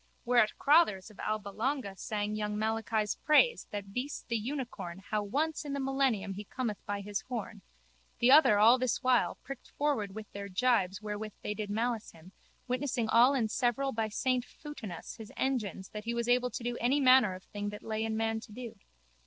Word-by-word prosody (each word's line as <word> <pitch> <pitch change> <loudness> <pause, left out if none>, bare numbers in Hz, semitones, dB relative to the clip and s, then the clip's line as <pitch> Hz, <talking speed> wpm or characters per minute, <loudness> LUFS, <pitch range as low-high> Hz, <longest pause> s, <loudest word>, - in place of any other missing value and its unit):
Whereat 240 -3 +4
Crotthers 275 - +3
of 210 - -19
Alba 215 -1 -2
Longa 225 -1 -2
sang 210 +1 -3
young 210 0 -2
Malachi's 220 -1 0
praise 475 +11 +4
of - - -38
that 200 -1 -6
beast 255 +3 -4
the 235 - 0
unicorn 225 -7 -4
how 215 -1 +1
once 290 +11 -1
in 290 -2 -5
the 280 - -2
millennium 265 -7 0
he 205 +2 -6
cometh 230 -2 -4
by 205 0 -2
his 200 0 -3
horn, 225 -4 -5 0.6
the 245 +2 +4
other 270 -7 +7
all 230 +5 +6
this 255 -2 0
while, 255 -1 +3
pricked 275 -2 -8
forward 235 -10 0
with 220 -1 -6
their 200 0 -6
jibes 200 -2 +1
wherewith 210 0 -4
they 210 - -2
did 210 -1 -5
malice 225 +1 -2
him, 165 +3 -15 0.4
witnessing 250 -3 -1
all 245 +5 +6
and 225 -5 0
several 260 +2 +1
by 220 -3 -1
saint 250 +3 0
Foutinus 250 - -9
his 220 -2 -10
engines 215 -8 -2
that 210 0 -7
he 235 +1 -2
was 235 0 -1
able 250 0 +3
to 235 - -6
do 240 0 -2
any 255 +5 +3
manner 255 -7 +6
of 185 - -11
thing 205 0 -5
that 210 0 -8
lay 220 0 -2
in 220 0 -1
man 225 0 0
to 220 - -13
do. 230 -2 -8
225 Hz, 200 wpm, -31 LUFS, 210-255 Hz, 0.6 s, other